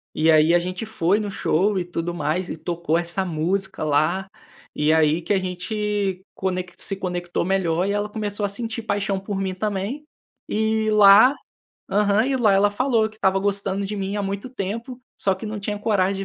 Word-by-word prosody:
E 160 +1 +4
aí 155 +2 +5
a 175 - +5
gente 185 +4 -4
foi 205 -2 +1
no 210 -1 -3
show 195 +1 +1
e 185 - 0
tudo 175 -1 -4
mais 175 +2 -2
e - - -4
tocou 165 0 -1
essa 175 +3 -1
música 185 +3 -2
lá, 155 +6 +1 0.4
e 150 +1 +2
aí 160 +1 +3
que 185 +5 -1
a - - +3
gente 190 +1 -2
conec 185 -1 -3
se 195 - -4
conectou 180 -3 -3
melhor 180 -2 +1
e 200 - 0
ela 205 0 -1
começou 210 -1 -3
a 200 - -1
sentir 225 +2 -4
paixão 200 -2 -1
por 195 0 -4
mim 190 -1 -2
também, 210 +8 -3 0.4
e 220 0 0
lá 210 +5 +7 0.6
aham, 205 +3 +3
e 270 -1 +1
lá 215 -5 +3
ela 200 +1 +4
falou 225 0 +1
que 215 - -19
estava 190 -2 +2
gostando 200 0 -1
de 210 +1 -4
mim 195 +1 -3
há 205 - -1
muito 200 +5 -4
tempo, 235 +3 -5 0.2
só 195 -1 +1
que 200 +4 -8
não 210 0 -4
tinha 205 +1 -3
coragem 195 -2 0
195 Hz, 195 wpm, -23 LUFS, 180-210 Hz, 0.6 s, lá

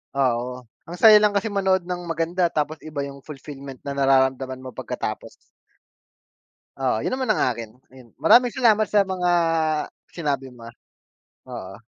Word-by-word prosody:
oo. 125 -1 -1 0.2
Ang 175 +2 -8
saya 215 -1 +9
lang 210 -1 +3
kasi 205 +2 0
manood 190 -2 +1
ng 180 0 -4
maganda, 165 +2 -1
tapos 155 +1 -1
iba 155 -2 -4
'yung 140 0 -6
fulfillment 140 -2 -10
na 140 0 -6
nararamdaman 130 -1 +1
mo 130 - -8
pagkatapos. 125 - -6 1.5
Oo. 130 -4 +1
'Yun - - -2
naman 260 -3 -2
ang 215 - +2
akin, 115 -1 -8 0.2
ayun. 130 -2 -15
Maraming 245 0 +5
salamat 220 -4 +3
sa 205 -2 +3
mga 185 -1 -4 0.9
sinabi 140 -5 -3
mo. 120 -2 -13 0.8
Oo. 95 +1 -8
145 Hz, 145 wpm, -23 LUFS, 130-190 Hz, 1.5 s, saya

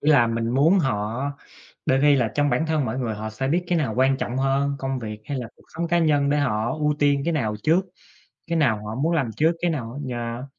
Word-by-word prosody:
Ý 155 - +2
là 120 -6 +6
mình 115 0 -1
muốn 155 +10 +4
họ 115 - -1 0.6
đôi 130 0 +3
khi 145 0 +5
là 120 -4 +1
trong 145 -1 +2
bản 160 - +1
thân 155 -3 +1
mỗi 120 +3 -3
người, 115 -4 -2
họ 110 +1 -5
sẽ 135 +5 -3
biết 175 +4 +1
cái 175 -1 +1
nào 150 - -1
quan 135 +1 +3
trọng 125 0 -3
hơn, 140 +1 +1
công 135 -1 -2
việc 110 -2 -6
hay 140 +1 -4
là 120 -2 -5
cuộc - - -22
sống 170 0 -2
cá 175 0 +2
nhân 145 -3 +2
để 150 - +2
họ 120 -4 0
ưu 150 -1 0
tiên 145 -1 +2
cái 170 - 0
nào 110 -9 -1
trước, 165 +4 +4 0.7
cái 170 -1 0
nào 110 -8 +1
họ 110 - -4
muốn 155 +7 0
làm 135 -8 0
trước 160 +2 +3
cái 175 - +1
nào 120 -7 -4 0.2
á, 120 - -3
yeah. 120 +1 -4
135 Hz, 260 wpm, -24 LUFS, 115-155 Hz, 0.7 s, là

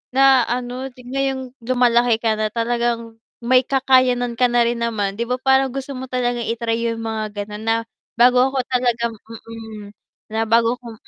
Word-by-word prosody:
na 270 -3 +5
ano 250 +2 -3
ngayong 260 +1 -4
lumalaki 240 -1 +3
ka 220 -1 -1
na 215 - +1
talagang 230 0 -2 0.2
may 255 +2 +5
kakayanan 255 -3 +2
ka 250 - +5
na 240 0 +3
rin 235 0 -1
naman, 215 -3 -2
'di 235 - -1
ba, 250 - 0
parang 265 +1 +3
gusto 270 +2 -6
mo 260 - -6
talagang 245 -2 -2
i-try 230 0 -1
yung 230 0 -3
mga 215 -2 -4
ganun 210 +1 -9
na 225 - +3 0.4
bago 245 +1 +5
ako 265 -1 -1
talagang, 240 -2 +1 0.4
mm, 220 -2 -9 0.4
na 220 +1 -1
bago 230 +2 +2
ako, 235 -2 -10
240 Hz, 170 wpm, -20 LUFS, 230-255 Hz, 0.4 s, na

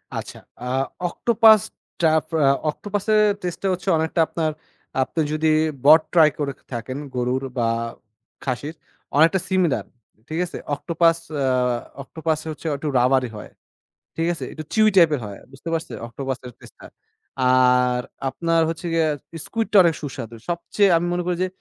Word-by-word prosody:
আচ্ছা, - - -6 0.2
আ - - -6 0.4
অক্টোপাস 225 -1 +5 0.4
টাপ 160 -1 +3 0.2
আ - - +5 0.2
অক্টোপাসের 205 +5 0 0.2
টেস্টেটা 180 +2 -3
হচ্ছে 185 +2 -3
অনেকটা 160 +1 -1
আপনার 160 -2 -1 0.5
আপনি 160 +5 -1
যদি 155 +1 0 0.4
বট 155 +2 +8
ট্রাই 160 -3 +7
করে 140 -2 -1 0.2
থাকেন 120 +3 -4 0.2
গরুর 125 +2 -1
বা 115 -1 +1 0.8
খাসির, 140 +4 -3 0.4
অনেকটা 165 +5 +5
সিমিলার। 185 -6 +1 0.4
ঠিক 160 +2 -3
আছে? 175 - -8 0.2
অক্টোপাস 165 +2 +2 0.2
আ - - +1 0.6
অক্টোপাস 160 +2 -2
হচ্ছে 155 +1 -7
একটু 140 +2 -5
rubbery 125 0 +3
হয়। - - -9 0.7
ঠিক 165 +1 0
আছে? 170 - -6
একটু 155 - -7
chewy 215 -1 +5
টাইপের 155 -5 +5
হয়। 100 -1 -8
বুঝতে 135 +5 -8
পারছেন? 160 -8 -3
অক্টোপাসের 130 0 -5
টেস্টটা। - - -14 0.5
আর 125 -1 +4 0.3
আপনার 165 +3 +1
হচ্ছে 165 +2 -5
গিয়া 165 -1 +2 0.4
স্কুইডটা 225 -2 0
অনেক 170 -2 +3
সুস্বাদু। 120 -5 -6
সবচেয়ে 185 +4 +1
আমি 175 - -1
মনে 180 - -1
করি 180 - +1
যে, 185 - +1
160 Hz, 145 wpm, -22 LUFS, 130-175 Hz, 0.8 s, বট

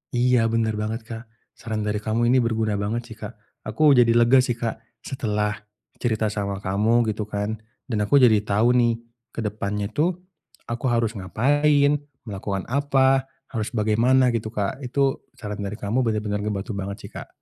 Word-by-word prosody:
Iya 120 -1 +3
bener 115 -1 0
banget 110 +2 -3
Kak. 115 0 -8 0.3
Saran 110 -2 -4
dari 105 0 -1
kamu 115 +2 0
ini 130 - +5
berguna 110 -3 0
banget 115 +4 -3
sih 110 - -9
Kak. 110 +1 -7 0.3
Aku 145 +8 +4
jadi 120 -3 +5
lega 120 +3 +6
sih 125 -2 +1
Kak, 115 -1 -3 0.2
setelah 105 -5 -2 0.4
cerita 110 -3 0
sama 100 -2 -3
kamu 110 +4 +2
gitu 105 0 -4
kan. 105 +1 -3 0.2
Dan 115 -5 -3
aku 145 - +3
jadi 110 -4 +6
tahu 105 +4 +2
nih 120 -1 +4 0.4
ke - - -4
depannya 105 -1 -3
itu 165 +9 +1 0.5
aku 120 +3 -4
harus 115 -3 +1
ngapain, 145 +8 +2 0.2
melakukan 100 -3 -4
apa, 135 -1 +2 0.2
harus 110 -3 -2
bagaimana 120 +4 +3
gitu 115 -2 -2
Kak. 105 +2 -3
Itu 135 +1 -1
saran 105 0 -6
dari 100 0 -4
kamu 105 +4 -1
bener-bener 105 -2 -1
ngebantu 105 +2 -3
banget 100 0 -4
sih - - -9
Kak. - - -8
110 Hz, 170 wpm, -23 LUFS, 105-125 Hz, 0.5 s, lega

